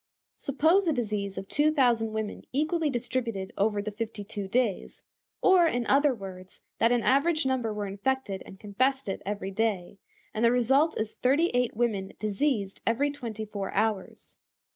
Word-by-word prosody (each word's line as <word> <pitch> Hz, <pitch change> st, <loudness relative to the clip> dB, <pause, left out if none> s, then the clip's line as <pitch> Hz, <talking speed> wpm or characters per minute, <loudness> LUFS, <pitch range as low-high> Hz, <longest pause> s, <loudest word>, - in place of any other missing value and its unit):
Suppose 320 Hz, +8 st, +3 dB
the 320 Hz, -, +3 dB
disease 210 Hz, -6 st, -2 dB
of 195 Hz, -, -5 dB
two 300 Hz, +7 st, +2 dB
thousand 240 Hz, -6 st, +2 dB
women 220 Hz, -1 st, -4 dB
equally 310 Hz, +3 st, 0 dB
distributed 235 Hz, -6 st, -2 dB
over 205 Hz, 0 st, +1 dB
the 215 Hz, -, -4 dB
fifty 215 Hz, 0 st, -5 dB
two 200 Hz, -1 st, -5 dB
days; 230 Hz, -1 st, -1 dB, 0.4 s
or, 365 Hz, -3 st, +6 dB
in 245 Hz, -6 st, -1 dB
other 285 Hz, +3 st, +4 dB
words, 190 Hz, -5 st, -8 dB, 0.2 s
that 230 Hz, -, +4 dB
an 240 Hz, -2 st, +2 dB
average 310 Hz, +3 st, +3 dB
number 255 Hz, -4 st, 0 dB
were 210 Hz, -1 st, -3 dB
infected 200 Hz, +1 st, -2 dB
and 190 Hz, -, -13 dB
confessed 255 Hz, +6 st, 0 dB
it 195 Hz, -, -3 dB
every 200 Hz, -1 st, -3 dB
day, 200 Hz, -3 st, -1 dB, 0.3 s
and 220 Hz, -, -1 dB
the 235 Hz, -, +5 dB
result 270 Hz, +6 st, +3 dB
is 215 Hz, 0 st, -1 dB
thirty 290 Hz, +7 st, +2 dB
eight 245 Hz, -3 st, 0 dB
women 210 Hz, -5 st, -1 dB
diseased 215 Hz, -1 st, -1 dB
every 275 Hz, +6 st, +2 dB
twenty 230 Hz, -6 st, -6 dB
four 200 Hz, -2 st, -5 dB
hours. 215 Hz, -4 st, -2 dB
230 Hz, 165 wpm, -28 LUFS, 205-270 Hz, 0.4 s, or